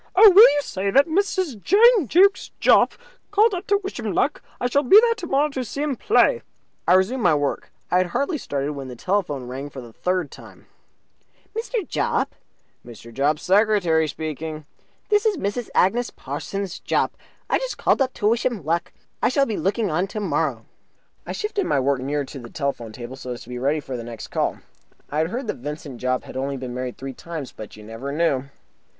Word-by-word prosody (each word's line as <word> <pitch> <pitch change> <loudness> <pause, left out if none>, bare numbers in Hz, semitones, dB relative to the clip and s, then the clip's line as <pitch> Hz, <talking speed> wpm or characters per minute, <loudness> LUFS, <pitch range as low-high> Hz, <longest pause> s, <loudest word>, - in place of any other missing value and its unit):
"Oh, 415 +2 +9
will 385 +3 +9
you 290 0 +1
say 195 -4 -2
that 275 +7 +5
Mrs. 350 - -1
Jane 430 - +5
Jukes 385 - +4
Jopp - - +5 0.4
called 420 +2 +4
up 365 +2 -4
to 405 - +4
wish 390 - -5
him - - -3
luck? - - +1 0.2
I - - -2
shall 280 +3 +2
be 380 +10 +8
there 465 0 +3
tomorrow 300 -8 0
to 265 -3 -3
see 280 +5 -4
him 295 -3 -1
play." 460 - +3 0.5
I - - +6
resumed 210 +8 +2
my 175 -6 +4
work. 145 -1 -2 0.2
I 180 - +4
had 185 - +1
hardly 280 - -1
started 140 - -3
when 135 -2 -7
the 125 - -8
telephone 150 - -1
rang 135 +3 -6
for 135 - -9
the 120 -3 -11
third 180 -1 -1
time. - - -14 0.9
"Mr. 455 -2 -3
Jopp?" - - -1 0.5
"Mr. 115 0 -12
Jopp's 145 +4 0
secretary 190 -5 +3
speaking." 155 0 -5 0.4
"This 420 +1 +3
is 420 -4 +1
Mrs. 215 +1 -3
Agnes 235 +6 +3
Parsons 180 +7 -5
Jopp. - - 0 0.3
I - - +1
just - - -4
called - - +2
up 260 -1 +1
to 205 - 0
wish 230 +2 +2
him 230 - -2
luck. 170 +2 -1 0.3
I - - +3
shall 275 +2 +2
be 220 - -3
looking 200 0 0
on 175 +5 0
tomorrow." 160 - -2 0.6
I - - -3
shifted 420 -2 -2
my 140 - +2
work 135 0 +1
nearer 140 +2 -1
to 135 - -9
the 120 -1 -10
telephone 140 -6 -3
table 120 +3 -8
so 125 -2 -5
as 120 - -9
to - - -16
be 125 0 -5
ready 140 +4 +1
for 135 -3 -6
the 120 - -5
next 115 -1 -8
call. - - -1 0.5
I 150 - -1
had 160 - +2
heard 245 +8 -4
that - - -3
Vincent 145 -1 -7
Jopp 130 0 0
had - - -11
only 135 +1 -2
been 125 -1 -6
married 125 0 -4
three 135 0 -6
times, 160 -1 -7
but 110 -1 -10
you 105 - -12
never 115 +6 -6
knew. 145 -4 +1
175 Hz, 205 wpm, -23 LUFS, -, 0.9 s, Oh